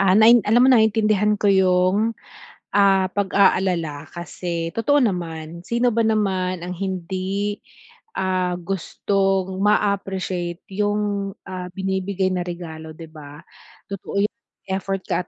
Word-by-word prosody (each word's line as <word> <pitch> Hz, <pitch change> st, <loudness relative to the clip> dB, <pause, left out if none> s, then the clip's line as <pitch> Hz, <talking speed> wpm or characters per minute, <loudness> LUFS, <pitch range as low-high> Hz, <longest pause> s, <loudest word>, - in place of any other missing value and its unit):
Ah, 195 Hz, -1 st, +4 dB
nain 230 Hz, +2 st, +7 dB
alam 240 Hz, +4 st, +5 dB
mo -, -, +5 dB
naintindihan 215 Hz, -2 st, +3 dB
ko 205 Hz, -, -8 dB
yung, 190 Hz, +3 st, +3 dB, 0.6 s
ah, 195 Hz, -2 st, +4 dB
pag-aalala 185 Hz, -6 st, +1 dB
kasi 170 Hz, 0 st, -4 dB
totoo 285 Hz, +6 st, +3 dB
naman 170 Hz, -, -3 dB
sino 240 Hz, +1 st, +1 dB
ba 230 Hz, -1 st, +1 dB
naman 190 Hz, -5 st, 0 dB
ang 180 Hz, +1 st, -6 dB
hindi, 190 Hz, +2 st, -3 dB, 0.6 s
ah, 185 Hz, -1 st, 0 dB
gustong 190 Hz, +1 st, -1 dB
maappreciate 195 Hz, -4 st, 0 dB
yung, 205 Hz, 0 st, -1 dB
ah, 185 Hz, -1 st, -6 dB
binibigay 190 Hz, 0 st, -1 dB
na 180 Hz, -1 st, -2 dB
regalo 160 Hz, -2 st, -7 dB
'di 165 Hz, -1 st, -11 dB
ba? 150 Hz, -1 st, -12 dB, 0.5 s
Totoo 200 Hz, +1 st, -2 dB
yung 210 Hz, -, 0 dB, 0.4 s
effort 195 Hz, 0 st, -2 dB
ka -, -, -1 dB
190 Hz, 120 wpm, -22 LUFS, 180-205 Hz, 0.6 s, nain